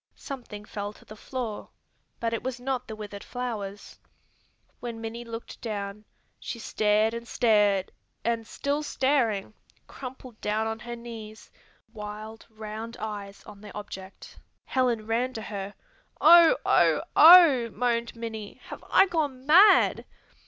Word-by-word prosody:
Something 235 -6 -8
fell 205 0 -5
to - - -19
the 215 - -11
floor, 235 -1 -5 0.5
but 230 0 -1
it 230 - -2
was 255 -1 -4
not 255 0 -3
the 220 - -6
withered 205 -1 -8
flowers. 210 -5 -6 0.8
When 235 -2 -6
Minnie 230 +1 -6
looked 230 0 -9
down, 205 -2 -5 0.3
she - - -6
stared 215 0 +1
and 235 0 -6
stared 210 -6 +2 0.3
and, 230 -1 -1
still 285 +1 -2
staring, 255 -9 0 0.3
crumpled 255 -3 -10
down 215 +1 0
on 220 0 -3
her 240 +1 -7
knees, 225 -2 -10 0.4
wild, 215 +1 -8
round 220 +1 -7
eyes 205 -2 -6
on 205 -1 -13
the 210 -1 -10
object. 195 -2 -10 0.3
Helen 245 -4 0
ran 240 +3 -1
to 220 - -5
her. 200 -1 -6 0.4
"Oh, 340 +7 +8
oh, - - +4
oh," 310 -8 +8
moaned 235 -1 -1
Minnie, 220 -3 -6
"have - - -9
I - - +6
gone 295 -8 -2
mad?" 360 +8 +6
225 Hz, 140 wpm, -27 LUFS, 210-250 Hz, 0.8 s, Oh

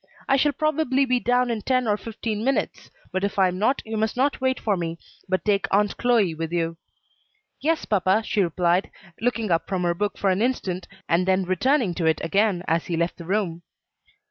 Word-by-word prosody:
I 270 - +4
shall 290 +2 +3
probably 285 -2 +1
be 250 -1 +1
down 245 +1 +1
in 225 -2 -2
ten 255 +1 +1
or 210 - +3
fifteen 220 0 -4
minutes; 270 +2 -1 0.2
but 190 +1 -2
if 200 0 -2
I 190 -2 +4
am 180 +1 -5
not, 255 +7 +1
you 220 0 -4
must 220 +2 -1
not 275 +1 +1
wait 260 0 +1
for 210 -3 0
me, 170 -2 -3 0.3
but 185 0 0
take 205 -2 +2
Aunt 205 +1 +2
Chloe 230 -8 +2
with 165 0 -4
you." 165 -1 -1 0.8
"Yes, 320 +1 0
papa," 195 +1 +2
she 210 - +1
replied, 175 +1 +1 0.3
looking 230 -4 0
up 165 0 +1
from 185 -2 -1
her 175 -1 +2
book 205 +3 -2
for 195 - +2
an 185 +2 0
instant, 195 -7 -1 0.2
and 175 +2 +2
then 190 0 +3
returning 200 - +1
to 170 -2 -1
it 160 - +2
again 195 +1 +1
as 165 0 0
he 170 - -1
left 170 +1 -1
the 170 - -9
room. 180 -3 -1
205 Hz, 210 wpm, -24 LUFS, 180-245 Hz, 0.8 s, I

